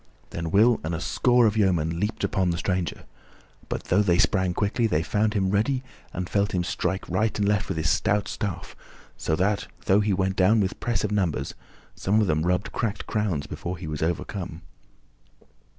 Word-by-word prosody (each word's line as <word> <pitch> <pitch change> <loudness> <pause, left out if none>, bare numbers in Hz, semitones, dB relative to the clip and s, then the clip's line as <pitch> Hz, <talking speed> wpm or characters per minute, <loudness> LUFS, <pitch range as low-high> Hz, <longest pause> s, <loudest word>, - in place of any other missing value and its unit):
Then 85 0 -4
Will 110 +6 +4
and 80 +2 -2
a - - -3
score 120 +6 +3
of 105 -1 +2
yeomen 85 -6 +1
leaped 105 +4 -2
upon 95 -3 +1
the 85 - -1
stranger, 90 -2 -2 0.7
but - - -3
though 100 +4 +3
they 90 -4 +3
sprang 95 -2 +2
quickly 110 +3 +1
they 80 -6 +1
found 105 +4 0
him 95 -2 +1
ready 125 +6 +1 0.3
and 90 +1 -4
felt 100 +1 0
him 90 - +1
strike 95 +2 -2
right 110 0 0
and 100 -1 +1
left 105 0 +1
with - - -2
his 80 -1 +1
stout 105 0 +1
staff, 90 -5 -4 0.4
so 80 - -1
that, 100 +4 0 0.2
though 95 +2 +4
he 105 0 +1
went 95 0 0
down 105 +4 +4
with 95 -2 -1
press 120 -2 -1
of 105 - -1
numbers, 95 -7 -1 0.4
some 105 +3 +1
of 110 - +3
them 80 -1 +1
rubbed 90 +1 0
cracked 105 -4 -2
crowns 95 -9 -1
before 85 +4 -5
he 85 - -8
was 75 -1 -4
overcome. 85 0 -3
95 Hz, 195 wpm, -25 LUFS, 85-105 Hz, 0.7 s, Will